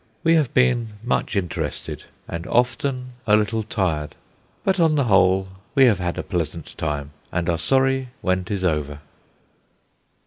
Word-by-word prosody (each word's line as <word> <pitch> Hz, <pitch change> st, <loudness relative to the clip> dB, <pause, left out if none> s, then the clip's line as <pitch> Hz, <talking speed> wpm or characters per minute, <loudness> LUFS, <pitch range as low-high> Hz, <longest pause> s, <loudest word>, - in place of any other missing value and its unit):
We 165 Hz, -, +4 dB
have 155 Hz, -7 st, +3 dB
been 120 Hz, -3 st, +2 dB
much 120 Hz, -1 st, -1 dB
interested, 90 Hz, -4 st, -3 dB, 0.2 s
and 85 Hz, +1 st, -5 dB
often 125 Hz, +1 st, 0 dB, 0.2 s
a 105 Hz, -, +6 dB
little 110 Hz, +1 st, +1 dB
tired. 90 Hz, -9 st, -2 dB, 0.5 s
But 190 Hz, -1 st, +1 dB
on 160 Hz, -2 st, +4 dB
the 140 Hz, -, +3 dB
whole 95 Hz, -3 st, +3 dB, 0.3 s
we 135 Hz, -2 st, +7 dB
have 110 Hz, -6 st, +4 dB
had 90 Hz, -1 st, -2 dB
a -, -, -2 dB
pleasant 85 Hz, -2 st, -4 dB
time, 75 Hz, -2 st, -3 dB, 0.2 s
and 85 Hz, -1 st, -1 dB
are 85 Hz, -2 st, +1 dB
sorry 135 Hz, +7 st, +2 dB
when 95 Hz, -1 st, +1 dB
'tis 95 Hz, +1 st, -3 dB
over." 75 Hz, -4 st, -1 dB
100 Hz, 150 wpm, -23 LUFS, 85-125 Hz, 0.5 s, we